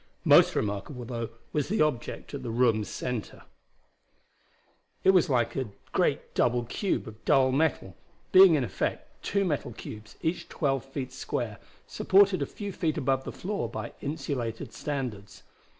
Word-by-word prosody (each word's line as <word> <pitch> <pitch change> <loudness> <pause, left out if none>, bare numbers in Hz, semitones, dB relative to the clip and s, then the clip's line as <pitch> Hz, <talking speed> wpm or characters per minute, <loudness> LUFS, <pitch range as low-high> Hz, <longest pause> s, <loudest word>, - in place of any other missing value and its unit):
Most - - +7
remarkable, 105 +5 -3
though, 115 -2 -4 0.2
was 150 +1 0
the 210 -5 +3
object 145 -3 -3
at 140 - -4
the 125 - -5
room's 115 -2 +2
center. 125 -4 -4 1.6
It 190 - +7
was 185 -5 +4
like 120 -3 +1
a 130 -5 -2 0.2
great - - 0
double 120 0 +2
cube 185 - -2
of 110 0 -11
dull 130 -1 +4
metal, 135 - 0 0.4
being 185 -3 +9
in 140 - +1
effect 110 - -4
two 200 0 +1
metal 145 -7 -2
cubes 110 0 -9
each 165 +2 -2
twelve 135 -5 0
feet 135 -1 -5
square, 115 -5 -3 0.3
supported 195 -3 +4
a 140 - 0
few 205 -1 -6
feet 160 -4 -1
above 135 -2 0
the - - -4
floor 200 +2 -3
by - - -6
insulated 130 -6 -4
standards. 125 -9 -5
135 Hz, 150 wpm, -28 LUFS, 115-155 Hz, 1.6 s, being